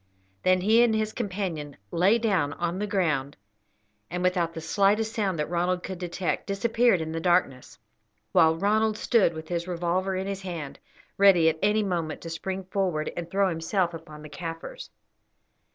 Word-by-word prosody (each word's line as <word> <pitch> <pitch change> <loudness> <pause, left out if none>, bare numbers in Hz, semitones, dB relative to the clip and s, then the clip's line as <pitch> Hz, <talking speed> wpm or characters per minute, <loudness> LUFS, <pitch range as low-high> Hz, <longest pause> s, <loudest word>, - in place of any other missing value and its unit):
Then 185 0 +3
he 220 +5 +5
and 235 -2 +4
his 215 0 -1
companion 185 - -4
lay 190 +7 +4
down 195 -11 +1
on 175 +1 -3
the 210 - -2
ground, 155 -9 0 0.7
and, 180 +2 -3
without 175 -3 +1
the - - -4
slightest 205 +6 +1
sound 195 -5 -1
that 150 - -1
Ronald 180 +1 0
could 185 -2 -6
detect, 175 -2 -3
disappeared 230 -1 +2
in 160 0 -4
the 165 - -3
darkness, 175 -7 0 0.5
while 160 0 +5
Ronald 215 +4 +1
stood 210 -9 +2
with 160 0 -7
his 170 0 -2
revolver 180 +2 -1
in 190 +1 -2
his 195 -1 -4
hand, 170 -7 -6 0.4
ready 185 -5 +6
at 160 0 -3
any 210 +2 +2
moment 170 -5 -2
to 165 - -7
spring 190 +3 -4
forward 180 -5 -1
and 170 -1 -5
throw 195 +1 +2
himself 170 +2 -1
upon 155 -2 -10
the 150 - -9
Kaffirs. 165 - -7
180 Hz, 170 wpm, -26 LUFS, 165-200 Hz, 0.7 s, ready